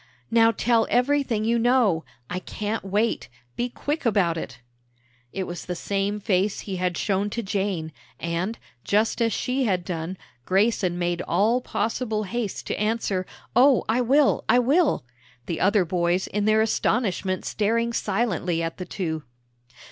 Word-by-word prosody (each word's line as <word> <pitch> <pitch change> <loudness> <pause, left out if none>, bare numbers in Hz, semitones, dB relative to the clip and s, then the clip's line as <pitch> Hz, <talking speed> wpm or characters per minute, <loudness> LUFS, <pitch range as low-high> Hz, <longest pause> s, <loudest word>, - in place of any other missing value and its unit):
"Now 225 0 +6
tell 230 +1 +2
everything 250 -3 +2
you 235 +1 +2
know! 230 -9 +3 0.2
I 180 - -3
can't 210 +4 -4
wait! 205 +4 0 0.3
Be 245 +1 -1
quick 295 +6 -3
about 200 -8 +2
it!" 130 -6 -6 0.7
It 195 - -3
was 175 -1 -6
the 180 - -3
same 200 +3 -1
face 200 -1 0
he 195 -2 -5
had 180 -1 -1
shown 200 0 0
to 235 +3 -3
Jane, 190 -5 -2 0.3
and, 170 +6 -2 0.3
just 215 +3 +1
as 230 -1 +3
she 255 +4 0
had 185 -5 0
done, 175 +1 -4 0.3
Grayson 190 - +1
made 175 0 -1
all 220 +8 +2
possible 220 -1 -1
haste 220 0 -3
to - - -3
answer, 210 -3 0 0.3
"Oh, 260 +1 +6
I 230 +3 +2
will, 270 +4 +3
I - - +6
will!" 275 - +3 0.4
the 165 - -3
other 195 -1 +3
boys 175 +1 +1
in 205 0 -2
their 215 0 +4
astonishment 200 -4 0
staring 230 +2 0
silently 190 -6 0
at 165 0 -4
the 180 - -5
two. 160 -6 -3
205 Hz, 155 wpm, -25 LUFS, 180-230 Hz, 0.7 s, Now